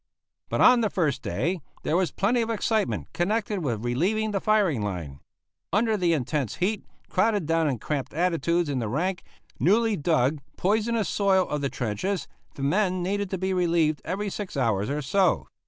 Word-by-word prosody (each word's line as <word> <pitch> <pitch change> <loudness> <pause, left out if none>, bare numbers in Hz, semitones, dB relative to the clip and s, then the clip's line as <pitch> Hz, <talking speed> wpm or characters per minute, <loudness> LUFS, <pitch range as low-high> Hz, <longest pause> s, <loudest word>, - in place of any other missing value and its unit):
But - - 0
on 250 -1 +7
the 215 - +1
first 150 -10 0
day 175 +4 -2 0.2
there 155 - 0
was 180 -1 +2
plenty 235 +5 +1
of 230 - -2
excitement 220 -2 -1
connected 210 +3 0
with 120 - -2
relieving 200 - 0
the 195 -2 -1
firing 200 - +2
line. 85 -9 -4 0.5
Under 220 +2 +2
the 175 -4 +2
intense 140 -4 -1
heat, 205 +3 -1 0.2
crowded 205 -2 +1
down 165 0 +2
in 130 - -1
cramped 140 +4 -3
attitudes 170 0 +1
in 140 -3 -1
the 115 -3 -2
rank, 175 - -1 0.4
newly 220 +4 +3
dug, 150 -3 +1 0.2
poisonous 220 +2 +1
soil 195 -2 +2
of 150 -1 -2
the 140 - 0
trenches, 130 - -2 0.3
the 135 - -6
men 185 +4 +1
needed 200 +1 -1
to 190 - -2
be 190 +1 -1
relieved 170 -4 +1
every 200 +2 -3
six 195 -7 -5
hours 110 -6 +1
or 145 +1 -2
so. 185 +6 +2
180 Hz, 175 wpm, -26 LUFS, 145-205 Hz, 0.5 s, on